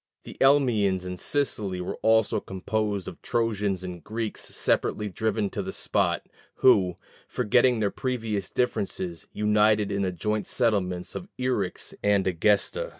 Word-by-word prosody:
The -, -, -10 dB
Elymians 115 Hz, -10 st, +3 dB
in 90 Hz, 0 st, -4 dB
Sicily 105 Hz, -8 st, 0 dB
also 110 Hz, +4 st, +2 dB
were -, -, -2 dB
composed 100 Hz, 0 st, -2 dB
of -, -, -8 dB
Trojans 105 Hz, -5 st, -1 dB
and 90 Hz, -3 st, -7 dB
Greeks 110 Hz, 0 st, -4 dB
separately 105 Hz, -1 st, 0 dB
driven 110 Hz, +1 st, -1 dB
to 100 Hz, -, -3 dB
the 95 Hz, 0 st, -5 dB
spot, -, -, 0 dB, 0.3 s
who, 95 Hz, -8 st, +4 dB, 0.3 s
forgetting 125 Hz, 0 st, +2 dB
their 100 Hz, -2 st, +1 dB
previous 115 Hz, -6 st, -2 dB
differences, 95 Hz, -8 st, -2 dB
united 105 Hz, 0 st, +2 dB
in 100 Hz, -, -1 dB
the 95 Hz, -2 st, 0 dB
joint 105 Hz, +5 st, -2 dB
settlements 95 Hz, -7 st, 0 dB
of 180 Hz, -, -6 dB
Eryx 125 Hz, -8 st, -2 dB
and 100 Hz, -1 st, +2 dB
Egesta. 105 Hz, -, +1 dB
105 Hz, 140 wpm, -26 LUFS, 95-115 Hz, 0.3 s, who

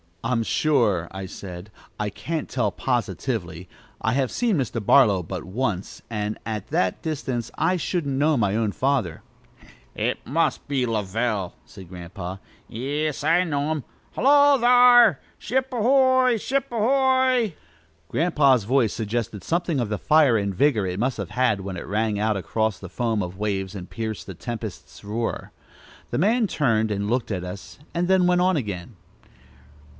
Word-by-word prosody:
"I'm 115 Hz, -1 st, 0 dB
sure," 110 Hz, -, +1 dB
I 95 Hz, 0 st, -6 dB
said, 95 Hz, +1 st, -9 dB, 0.3 s
"I 105 Hz, 0 st, -1 dB
can't 155 Hz, +10 st, -4 dB
tell, -, -, 0 dB
positively. 115 Hz, -, -3 dB, 0.3 s
I 110 Hz, -, +1 dB
have 130 Hz, -1 st, 0 dB
seen 235 Hz, -4 st, +1 dB
Mr. 120 Hz, -4 st, -2 dB
Barlow 105 Hz, -5 st, +5 dB
but 90 Hz, 0 st, -6 dB
once, 100 Hz, 0 st, -3 dB
and 105 Hz, -1 st, -3 dB
at 110 Hz, -3 st, -4 dB
that 95 Hz, -1 st, 0 dB
distance 130 Hz, -7 st, -3 dB
I 180 Hz, +3 st, +2 dB
shouldn't 155 Hz, -5 st, -2 dB
know 150 Hz, +1 st, +3 dB
my 100 Hz, -3 st, +1 dB
own 110 Hz, -2 st, 0 dB
father." 130 Hz, -, -1 dB, 1.0 s
"Must 165 Hz, +6 st, 0 dB
be 135 Hz, -3 st, 0 dB
Lovell," 105 Hz, -2 st, -1 dB
said 95 Hz, -3 st, -13 dB
Grandpa. 90 Hz, +1 st, -7 dB, 0.3 s
"Yis, 145 Hz, +5 st, -3 dB
I 165 Hz, +4 st, +4 dB
know 145 Hz, -3 st, -1 dB
him! 155 Hz, -4 st, -2 dB, 0.3 s
Hullo, 285 Hz, +2 st, +5 dB
thar'! 245 Hz, -, +6 dB, 0.2 s
Ship 260 Hz, +4 st, -1 dB
ahoy! 255 Hz, 0 st, +4 dB
ship 270 Hz, +5 st, -1 dB
ahoy!" 255 Hz, -, +2 dB, 0.5 s
Grandpa's 140 Hz, -, +3 dB
voice 120 Hz, 0 st, +2 dB
suggested 110 Hz, -1 st, -3 dB
something 170 Hz, -3 st, 0 dB
of 120 Hz, -4 st, -1 dB
the 105 Hz, -, -1 dB
fire 150 Hz, -7 st, +4 dB
and 100 Hz, -1 st, -1 dB
vigor 110 Hz, -1 st, +2 dB
it 90 Hz, +1 st, -3 dB
must 125 Hz, +3 st, 0 dB
have -, -, -5 dB
had 125 Hz, -6 st, +1 dB
when 95 Hz, -1 st, -5 dB
it -, -, -6 dB
rang 105 Hz, +1 st, -1 dB
out 110 Hz, -1 st, +1 dB
across 110 Hz, +3 st, -1 dB
the 95 Hz, -, -9 dB
foam 115 Hz, -2 st, -1 dB
of 90 Hz, 0 st, -5 dB
waves 95 Hz, -2 st, -2 dB
and 90 Hz, -2 st, -8 dB
pierced 110 Hz, -2 st, -5 dB
the 95 Hz, -, -6 dB
tempest's 95 Hz, -, -7 dB
roar. 110 Hz, +3 st, -3 dB, 0.6 s
The -, -, -1 dB
man 220 Hz, +6 st, +3 dB
turned 115 Hz, -, +1 dB
and 100 Hz, 0 st, -2 dB
looked 120 Hz, -1 st, -1 dB
at 90 Hz, -3 st, -2 dB
us, 90 Hz, +6 st, -9 dB
and 175 Hz, +1 st, 0 dB
then 185 Hz, -1 st, +4 dB
went 180 Hz, 0 st, +3 dB
on 185 Hz, 0 st, +3 dB
again. 105 Hz, -, -4 dB
120 Hz, 160 wpm, -24 LUFS, 100-160 Hz, 1.0 s, thar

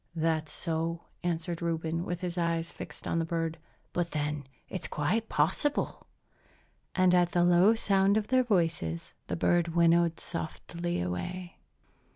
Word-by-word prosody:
"That's 160 Hz, -1 st, 0 dB
so," 165 Hz, 0 st, -1 dB, 0.2 s
answered 170 Hz, 0 st, -2 dB
Reuben, 165 Hz, 0 st, -1 dB
with 175 Hz, -1 st, -3 dB
his 175 Hz, -1 st, -3 dB
eyes 170 Hz, -1 st, 0 dB
fixed -, -, -9 dB
on 165 Hz, -, +1 dB
the -, -, +1 dB
bird, 165 Hz, -1 st, -2 dB, 0.3 s
"but 175 Hz, -1 st, 0 dB
then 150 Hz, -2 st, -2 dB, 0.2 s
it's 185 Hz, -, -3 dB
quite 215 Hz, +10 st, 0 dB
possible!" 165 Hz, -, 0 dB, 0.9 s
And 185 Hz, -1 st, +4 dB
at 175 Hz, -1 st, +3 dB
the 175 Hz, -, +4 dB
low 175 Hz, +5 st, +6 dB
sound 195 Hz, -2 st, +3 dB
of 215 Hz, -1 st, -1 dB
their 255 Hz, 0 st, +4 dB
voices 165 Hz, -, 0 dB
the -, -, -2 dB
bird 170 Hz, -1 st, +2 dB
winnowed 170 Hz, 0 st, +4 dB
softly 170 Hz, +1 st, -4 dB
away. 175 Hz, -, -4 dB
170 Hz, 145 wpm, -30 LUFS, 165-180 Hz, 0.9 s, low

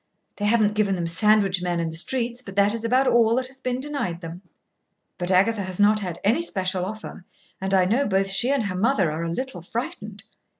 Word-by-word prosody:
They 205 Hz, -, -2 dB
haven't 210 Hz, -1 st, +3 dB
given 205 Hz, -2 st, +1 dB
them 175 Hz, -2 st, -3 dB
sandwich 195 Hz, +1 st, +3 dB
men 175 Hz, -1 st, -1 dB
in 165 Hz, -1 st, -2 dB
the -, -, -8 dB
streets, 240 Hz, +6 st, -1 dB
but 195 Hz, -6 st, -10 dB
that 200 Hz, +1 st, +3 dB
is 230 Hz, -1 st, -5 dB
about 255 Hz, +4 st, +2 dB
all 230 Hz, -2 st, +4 dB
that 255 Hz, 0 st, -1 dB
has 265 Hz, 0 st, -19 dB
been 250 Hz, -1 st, -2 dB
denied 265 Hz, -, -3 dB
them. 170 Hz, +1 st, -8 dB, 0.8 s
But 175 Hz, 0 st, -1 dB
Agatha 200 Hz, +4 st, +3 dB
has 185 Hz, -1 st, -6 dB
not 210 Hz, +1 st, +4 dB
had 180 Hz, -5 st, -5 dB
any 225 Hz, +11 st, +2 dB
special 185 Hz, -, -1 dB
offer, 215 Hz, -2 st, -8 dB, 0.4 s
and 190 Hz, 0 st, -2 dB
I 190 Hz, -2 st, +4 dB
know 235 Hz, +9 st, +1 dB
both 195 Hz, -1 st, +1 dB
she 195 Hz, +6 st, +2 dB
and 275 Hz, -4 st, +1 dB
her 200 Hz, -3 st, -3 dB
mother 190 Hz, -, +1 dB
are 160 Hz, +2 st, -4 dB
a 165 Hz, -, -3 dB
little 195 Hz, 0 st, -4 dB
frightened. 210 Hz, 0 st, -6 dB
205 Hz, 220 wpm, -24 LUFS, 185-235 Hz, 0.8 s, all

